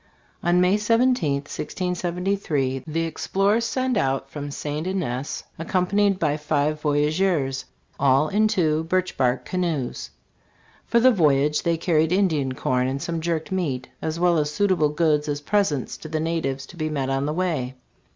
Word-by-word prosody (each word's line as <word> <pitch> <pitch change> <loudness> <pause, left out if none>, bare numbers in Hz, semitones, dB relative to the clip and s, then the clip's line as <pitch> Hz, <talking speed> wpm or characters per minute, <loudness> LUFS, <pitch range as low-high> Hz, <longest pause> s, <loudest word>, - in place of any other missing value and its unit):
LAC. 175 - -1
On 180 - +4
May 185 +3 +4
17, 230 - +2
1673, 175 -4 -2
the 160 +1 -1
explorers 195 +7 0
set 255 +1 0
out 135 -4 0
from 145 -1 -5
St. 150 +3 -4
Ignace. 145 -8 -3 0.2
accompanied 190 +4 +1
by 150 -4 0
five 150 0 0
voyageurs, 150 -1 +1 0.3
all 140 +2 +4
in 215 +5 +2
two 160 -7 +1
birch 185 +2 0
bark 125 -1 +1
canoes. 170 -8 -2 0.8
For 235 - +3
the 255 +2 +6
voyage 150 - +3
they 170 -1 +1
carried 160 -1 +2
Indian 160 -9 +1
corn 125 -1 0
and 135 +1 -2
some 165 +3 -3
jerked 165 0 -2
meat, 140 -9 -2
as 160 +1 -3
well 175 -2 +3
as 150 -1 0
suitable 185 -3 +2
goods 150 -1 +1
as 145 0 -1
presents 150 - 0
to - - -9
the 155 0 -1
natives 155 -5 -2
to 175 - -14
be 155 -1 -2
met 135 -3 -2
on 135 +1 0
the - - 0
way. 155 -8 -1
160 Hz, 160 wpm, -24 LUFS, 145-185 Hz, 0.8 s, the